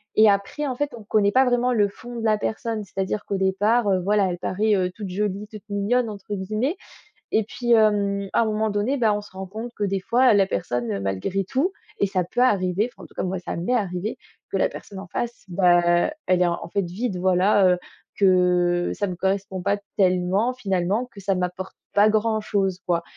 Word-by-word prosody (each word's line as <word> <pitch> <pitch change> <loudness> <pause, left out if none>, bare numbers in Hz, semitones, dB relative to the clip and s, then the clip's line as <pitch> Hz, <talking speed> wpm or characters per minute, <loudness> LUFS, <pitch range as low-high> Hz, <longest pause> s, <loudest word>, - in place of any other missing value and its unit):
et 215 0 +7
après, 200 +9 0
en 260 - -2
fait, 290 +1 -2
on 225 - -11
connaît 205 -1 +2
pas 260 +4 +4
vraiment 245 0 +2
le 210 -4 +3
fond 240 +4 -10
de 225 - -3
la 215 -1 +3
personne, 220 0 -3
c'est-à-dire 195 +1 -3
qu'au 200 - -2
départ, 205 +4 +2
heu, 190 -1 +3
voilà, 205 +2 +2
elle 175 -1 -4
paraît, 210 +4 0
heu, 185 -2 +1
«toute 205 -1 -6
jolie, 200 +2 -2
toute 215 -1 -10
mignonne» 215 +4 +1
entre 205 0 -7
guillemets, 215 - -1 0.6
et 220 - +3
puis, 240 +3 -1
hem, 200 -3 +2
à - - +3
un - - +2
moment 215 0 0
donné, 210 +7 0
beh, 230 -4 +3
on 210 0 0
se 210 - -14
rend 190 0 -6
compte 220 +5 -7
que 210 - -3
des 195 -1 0
fois 245 +5 +4
la 195 -2 +4
personne 120 - -2
malgré 100 - -1
tout 270 - -1 0.3
et 200 - +3
ça 185 -1 0
peut 175 - -5
arriver 200 -2 +2
enfin, 195 - -15
en - - -9
tout - - -17
cas, - - -2
moi, 185 +1 -2
ça 180 - -5
m'est 175 +9 -1
arrivée, 195 -1 -2 0.3
que - - -4
la - - +2
personne 200 - -10
en 195 - -9
face, 235 +6 -4
beh, 175 -1 +3 0.2
elle 185 -1 +3
est, 180 - +4
en 170 0 -3
fait, 200 +2 0
vide, 190 +3 -3
voilà, 185 +2 +4
heu, - - -1 0.4
que 180 -2 +3
ça 205 - -1
me 180 - -4
correspond 190 0 -2
pas 200 +3 +1 0.2
tellement, 190 +5 +2
finalement, 195 0 -1
que 230 -5 -15
ça 195 0 0
m'apporte 180 +1 -4 0.2
pas 205 +1 +5
grand-chose, 215 -3 0
quoi 170 -1 +1
200 Hz, 220 wpm, -23 LUFS, 185-220 Hz, 0.6 s, et